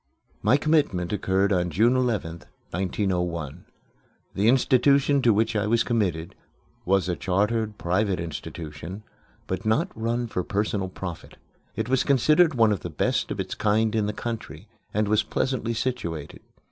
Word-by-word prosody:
My 115 +7 +4
commitment 140 - +1
occurred 95 0 +1
on 90 -1 +1
June 110 +10 +3
11th, 110 -10 -1 0.3
1901. 90 -4 -2 0.7
The 100 +3 +1
institution 135 +2 +4
to 120 - +4
which 110 +2 +1
I 105 -1 +1
was 115 +1 +3
committed 90 -9 -1 0.5
was 95 0 +2
a 90 - 0
chartered, 105 +4 0
private 95 +2 0
institution, 80 +3 -7 0.4
but 95 0 -4
not 145 - +1
run 115 +2 -1
for 90 -5 -3
personal 100 -1 -1
profit. 90 -3 -8 0.4
It 110 - -2
was 130 +1 +2
considered 150 +4 +4
one 115 -3 +4
of 100 - 0
the 85 - -6
best 75 - 0
of - - -4
its - - -3
kind 110 +1 +1
in 110 -2 +1
the - - 0
country 110 -6 -6 0.2
and 105 0 0
was 110 +1 +3
pleasantly 120 -2 -2
situated. 85 - -3
105 Hz, 150 wpm, -25 LUFS, 90-115 Hz, 0.7 s, My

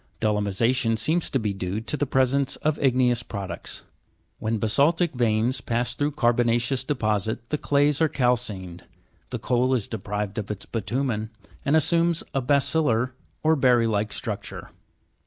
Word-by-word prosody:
Dolomi 105 -1 +1
sa'tion 115 +2 +1
seems 160 +10 0
to - - +1
be 105 -5 -1
due 95 +1 -3
to 115 +6 -3
the 145 -1 -1
presence 130 +1 +2
of 155 0 -1
igneous 125 -3 +2
products. 95 -6 -6 0.6
When 110 0 -1
basa'ltic 150 - +2
veins 120 +1 +1
pass 120 +1 -1
through 145 +2 -1
carbona'ceous 120 0 +2
deposits, 110 -6 -1
the 150 - -1
clays 145 +1 +2
are 160 - +4
calcined, 110 -10 -1 0.4
the - - -3
coal 125 +1 +1
is 115 -5 -2
deprived 105 0 -4
of 105 - -6
its 105 -2 -5
bitu'men, 115 0 -2 0.3
and 145 - +2
assumes 170 +1 +2
a 135 - +1
baccil 140 +4 +2
lar 130 +6 0
(berry 125 -3 +4
like) 105 -1 0
structure. - - -6
120 Hz, 150 wpm, -25 LUFS, 110-140 Hz, 0.6 s, are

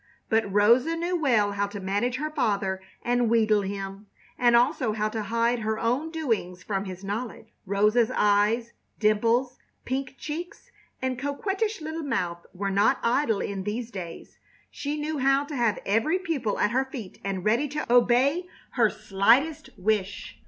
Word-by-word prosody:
But 220 -3 +1
Rosa 235 +10 +4
knew 345 +2 -1
well 235 -11 +2
how 200 0 -1
to 200 0 -7
manage 205 +6 -1
her 305 +3 -3
father 200 -9 0 0.2
and 245 -1 +1
wheedle 220 -2 +3
him, 195 +1 -6 0.3
and 240 -1 +4
also 250 -1 +2
how 215 0 -1
to 220 0 -3
hide 230 +3 +1
her 220 0 -1
own 250 +8 0
doings 225 - -2
from 195 -1 -2
his 185 0 -8
knowledge. 220 +2 -5 0.2
Rosa's 210 +4 +3
eyes, 210 +3 +2 0.2
dimples, 230 +4 +2 0.3
pink 265 +1 -3
cheeks, 335 +4 -7 0.3
and 255 -1 -1
coquettish 390 - -2
little 315 +1 -4
mouth 175 - -2
were 195 +2 -3
not 200 +2 +3
idle 235 -3 +2
in 200 -1 -3
these 225 +4 -4
days. 180 -5 -8 0.3
She 295 +1 -4
knew 300 0 -2
how 275 +1 +3
to 290 0 -6
have 235 -5 +1
every 225 - +2
pupil 310 - -2
at 210 - +2
her 260 +2 +1
feet 245 -8 -9
and 195 -1 -3
ready 235 +7 +2
to 300 +2 -4
obey 255 +8 +4 0.2
her 235 -4 +3
slightest 230 +11 +2
wish. 200 0 -1
230 Hz, 160 wpm, -26 LUFS, 205-275 Hz, 0.3 s, Rosa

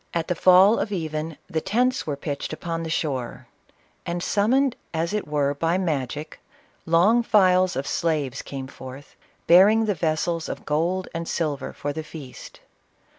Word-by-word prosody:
27 170 -1 -1
the - - -17
fall 185 +4 +6
of 205 - -2
even, 160 -3 -3
the 160 - -2
tents 250 +6 0
were 145 - -1
pitched 140 0 -5
upon 165 +1 -4
the 165 - -5
shore, 135 -7 -3 0.6
and, 175 0 -3
summoned 250 +6 +2 0.2
as 165 +4 -1
it 210 -6 -2
were 145 -1 0
by 165 +5 0
magic, 150 -4 -3 0.5
long 180 +9 +4
files 185 - +3
of 135 +1 -2
slaves 145 -3 -1
came 135 -1 -7
forth, 130 +1 -11 0.3
bearing 205 +6 +6
the 210 - +1
vessels 165 0 -1
of - - -6
gold 170 +5 0
and 165 0 -4
silver 150 -5 -2
fur 145 0 -4
the 160 - -4
feast. 145 -5 -11
165 Hz, 160 wpm, -24 LUFS, 150-185 Hz, 0.6 s, fall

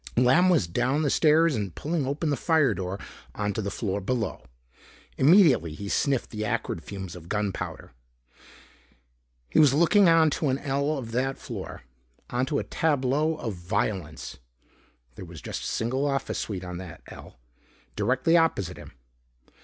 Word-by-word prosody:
Lamb 130 +10 +5
was 170 - +3
down 125 - 0
the 145 - +1
stairs 160 0 +4
and 100 -6 -4
pulling 155 -3 -2
open 145 +3 -1
the - - +2
firedoor 110 - +1 0.4
onto 105 0 -2
the 100 - -3
floor 100 0 -3
below. 110 0 -2 0.7
Immediately 135 - +5
he 100 +3 -6
sniffed 135 +2 0
the 110 -1 -4
acrid 110 -7 -2
fumes 95 -4 -7
of 85 -1 -12
gunpowder. 105 -2 -3 1.6
He - - +2
was 145 -3 +6
looking 175 +4 +5
out 165 - +6
onto 155 -1 +1
an 130 0 +1
ell 140 +2 -1
of 115 -4 -6
that 130 +3 -1
floor. - - -8 0.5
Onto 130 +4 0
a - - -1
tableau 150 +1 0
of 115 -8 -4
violence. 90 -3 -3 0.8
There 95 - -9
was 85 -2 -10
just - - -6
a - - -2
single 130 +5 -1
office 135 -1 -2
suite 95 -4 -4
on 90 -1 -6
that 90 -4 -10
ell, - - -12 0.6
directly 130 +6 +2
opposite 100 - +1
him. - - -12
125 Hz, 155 wpm, -26 LUFS, 100-150 Hz, 1.6 s, was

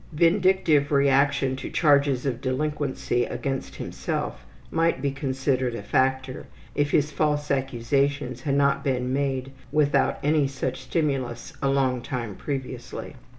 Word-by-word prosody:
Vindictive 170 -3 +3
reaction 140 -1 +3
to - - -6
charges 140 -4 +3
of 130 -3 -2
delinquency 135 -2 -1
against 135 -1 -4
himself 65 - -4 0.3
might 165 -3 +2
be 140 +1 0
considered 130 -2 -1
a 105 - -6
factor 130 +3 0 0.3
if 145 0 +1
his 150 0 +2
false 150 -1 0
accusations 135 0 0
had 140 +1 0
not 140 0 +2
been 125 -1 0
made 135 -1 -1 0.2
without 150 -2 +2
any 150 -1 +3
such 130 -1 -3
stimulus 130 -4 -2
a 140 - +2
long 130 -2 +1
time 120 -4 -4
previously. 130 -1 -5
135 Hz, 130 wpm, -25 LUFS, 130-145 Hz, 0.3 s, Vindictive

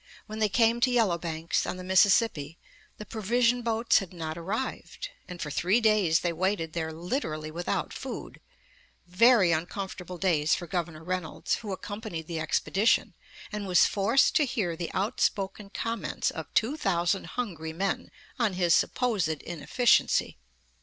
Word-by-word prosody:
When 215 0 -7
they 215 -1 +2
came 230 +2 +3
to 255 - +4
Yellow 220 -9 +2
Banks, 165 0 -2
on - - -3
the 185 - -7
Mississippi, 190 -4 +3 0.4
the 210 - -8
provision 235 +3 +1
boats 230 0 +2
had 190 -3 -8
not 160 -2 -5
arrived, 215 - -4 0.2
and 180 -1 -8
for 150 - -4
three 185 +10 +2
days 215 -8 +3
they 175 -1 0
waited 170 -2 -1
there 160 -1 -2
literally 160 - -3
without 175 +2 -2
food; - - -7 0.6
very 190 +1 +5
uncomfortable 180 +2 -4
days 160 -4 +2
for 175 - -6
Governor 165 -3 -4
Reynolds, 180 -2 -3
who 210 -3 -7
accompanied 205 -3 -6
the 165 0 -4
expedition, 195 +6 +1 0.4
and 210 -1 -4
was 180 -1 +5
forced 215 +6 +3
to 300 - +3
hear 200 -10 -2
the 170 0 -5
outspoken 200 -1 -1
comments 230 +2 -2
of - - -7
two 240 +7 +2
thousand 185 - 0
hungry 170 -10 -3
men 190 +4 -2 0.3
on 225 -5 +2
his 175 -2 +2
supposed 220 -8 +1
inefficiency. 170 - +1
190 Hz, 150 wpm, -28 LUFS, 170-220 Hz, 0.6 s, very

